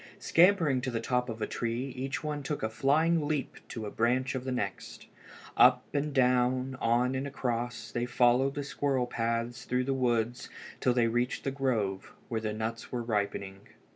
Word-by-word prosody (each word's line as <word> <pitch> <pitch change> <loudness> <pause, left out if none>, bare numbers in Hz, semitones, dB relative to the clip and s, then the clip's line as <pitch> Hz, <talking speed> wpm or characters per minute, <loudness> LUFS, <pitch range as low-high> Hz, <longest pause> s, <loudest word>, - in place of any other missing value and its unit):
Scampering 165 -7 +4
to 130 - -2
the 115 -2 -2
top 125 +1 0
of 110 -1 -4
a - - +2
tree 120 +3 -3
each 135 +3 -3
one 150 -1 -3
took 145 +1 -4
a 110 - +1
flying 155 +6 +2
leap 150 -3 -2
to 110 -2 -6
a 105 - -5
branch 125 +3 +1
of 130 -1 -4
the 130 - -2
next. 100 -6 -4 0.5
Up 125 0 +6
and 145 +1 0
down, 125 0 +2
on 120 +3 +2
and 135 +2 -2
across, 120 -3 -3
they 120 0 -2
followed 125 +3 +3
the 145 - -2
squirrel 140 -2 0
paths 115 0 -2
through 125 0 0
the 135 +1 0
woods 120 -2 0 0.3
till 125 -1 +2
they 120 -2 +4
reached 120 +2 -1
the 135 - -1
grove, 115 -8 -1 0.2
where 115 -2 -1
the 110 -1 -2
nuts 110 +2 -4
were 120 -2 -2
ripening. 100 -3 -2
125 Hz, 185 wpm, -30 LUFS, 115-135 Hz, 0.5 s, Up